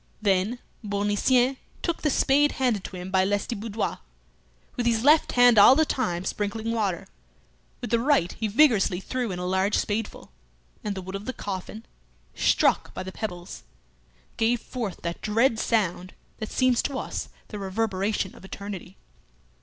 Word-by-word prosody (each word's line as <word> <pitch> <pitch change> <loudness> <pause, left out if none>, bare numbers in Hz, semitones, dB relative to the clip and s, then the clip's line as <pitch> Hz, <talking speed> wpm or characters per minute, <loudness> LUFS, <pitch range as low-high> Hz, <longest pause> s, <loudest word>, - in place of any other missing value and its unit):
Then 200 +3 +1 0.3
Bournisien 210 +6 +2 0.3
took 340 -2 -1
the 305 - +1
spade 290 +2 +3
handed 245 -7 0
to - - -7
him 180 +1 -7
by 190 0 +3
Lestiboudois; 205 +2 -2 0.8
with 240 -1 -1
his 225 -1 +2
left 300 +3 +5
hand 245 -3 +6
all 230 +6 +9
the 315 +2 +3
time 180 - -2
sprinkling 215 +3 -2
water, 200 -5 -1 0.8
with 240 - -5
the 235 - +3
right 235 - +2
he 220 - -2
vigorously 215 -6 +3
threw 245 +4 -3
in 180 - -4
a 180 - -4
large 190 +3 +1
spadeful; 210 - -3 0.5
and 205 -1 -3
the 190 - -6
wood 190 +1 -8
of 195 +1 -5
the 260 - -3
coffin, 205 +2 -6 0.5
struck - - +2
by - - -4
the 190 - -7
pebbles, 175 -4 -6 0.8
gave 235 +1 +2
forth 225 -5 -6
that 170 0 -4
dread 225 +2 +2
sound 185 -5 0 0.2
that 220 - -4
seems 255 -2 +3
to 275 - -3
us - - -4 0.2
the 210 - -6
reverberation 195 0 -1
of - - -15
eternity. 195 -1 -8
210 Hz, 160 wpm, -26 LUFS, 190-245 Hz, 0.8 s, all